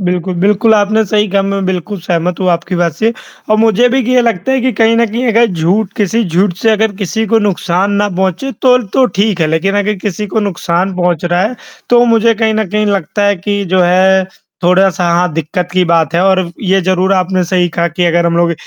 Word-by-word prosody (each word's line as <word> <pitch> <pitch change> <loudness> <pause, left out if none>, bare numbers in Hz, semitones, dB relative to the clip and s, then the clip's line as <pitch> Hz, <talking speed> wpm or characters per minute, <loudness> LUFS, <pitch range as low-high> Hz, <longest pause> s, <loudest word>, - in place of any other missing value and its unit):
बिल्कुल, 180 0 -2
बिल्कुल 205 +5 +2
आपने 215 +1 +1
सही 210 +1 0
कहा। 195 +1 +1
मैं 195 0 -2
बिल्कुल 190 +2 -4
सहमत 175 +1 -2
हूँ 185 - 0
आपकी 170 +2 -2
बात 170 -2 0
से 220 +7 0 0.4
और 215 - +4
मुझे 225 +2 +3
भी 265 +2 +1
ये 250 - +4
लगता 230 +1 -1
है 265 - +1
कि 255 +1 0
कहीं 225 +2 +2
न 235 0 +2
कहीं 235 +4 -3
अगर 230 +1 +3
झूठ 185 +3 -1
किसी 215 +3 0
झूठ 180 +2 0
से 225 - +3
अगर 220 0 +1
किसी 220 +3 -2
को 225 +2 +2
नुकसान 195 -1 -1
ना 205 - 0
पहुँचे 190 +8 -2
तो 250 -1 +5 0.2
तो 260 - +4 0.2
ठीक 205 -5 0
है 160 - +2
लेक़िन 160 +6 -1
अगर 210 +1 0
किसी 210 +1 -3
को 220 +3 -2
नुकसान 185 -1 -2
पहुँच 175 -2 -1
रहा 175 +1 0
है 230 +4 -2 0.3
तो 240 0 +5
मुझे 230 0 +3
कहीं 220 0 0
न 215 -3 -1
कहीं 210 0 0
लगता 200 0 -1
है 205 - +1
कि 200 +2 -3
जो 185 - +3
है 190 +2 +3 0.4
थोड़ा-सा 180 0 +2
हाँ 175 0 +1
दिक़्क़त 165 +3 -3
की 185 0 +2
बात 165 -2 +1
है। 170 - +2
और 190 -1 +3 0.2
ये 195 0 +1
ज़रूर 185 +1 0
आपने 185 0 0
सही 180 0 0
कहा 170 0 -1
कि 175 +2 -2
अगर 170 0 +1
हम 170 - 0
लोग 170 0 +2
195 Hz, 230 wpm, -12 LUFS, 175-215 Hz, 0.4 s, तो